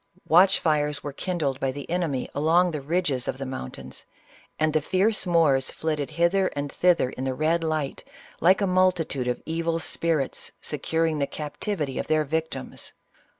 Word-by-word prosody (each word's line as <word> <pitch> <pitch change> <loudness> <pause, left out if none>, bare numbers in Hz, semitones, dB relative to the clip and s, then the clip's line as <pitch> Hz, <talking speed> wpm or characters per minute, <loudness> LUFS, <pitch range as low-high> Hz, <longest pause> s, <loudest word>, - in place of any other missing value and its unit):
Watch 185 +4 +6
fires 150 -2 0
were 145 - -5
kindled 150 -5 -2
by 135 -1 0
the 140 +1 -7
enemy 165 -7 -1
along 165 +5 +3
the 150 -3 -4
ridges 145 -4 -1
of - - -2
the 135 - -5
mountains, 130 - -7 0.5
and 155 0 +1
thev 155 -2 +1
fierce 195 +4 +1
Moors 150 -6 +3
flitted 150 -3 -2
hither 185 +3 +2
and 145 0 -3
thither 175 -8 +3
in 130 - -6
the 130 -1 -1
red 165 +3 +1
light, 155 -3 -2 0.4
like 185 +4 +4
a - - +3
multitude 180 -8 +1
of 125 - -2
evil 165 0 -1
spirits 165 -4 -1
securing 160 -1 -1
the 140 - +1
captivity 150 -1 -4
of - - -3
their 155 0 +2
victims. 160 +2 -4
155 Hz, 165 wpm, -25 LUFS, 140-170 Hz, 0.5 s, Watch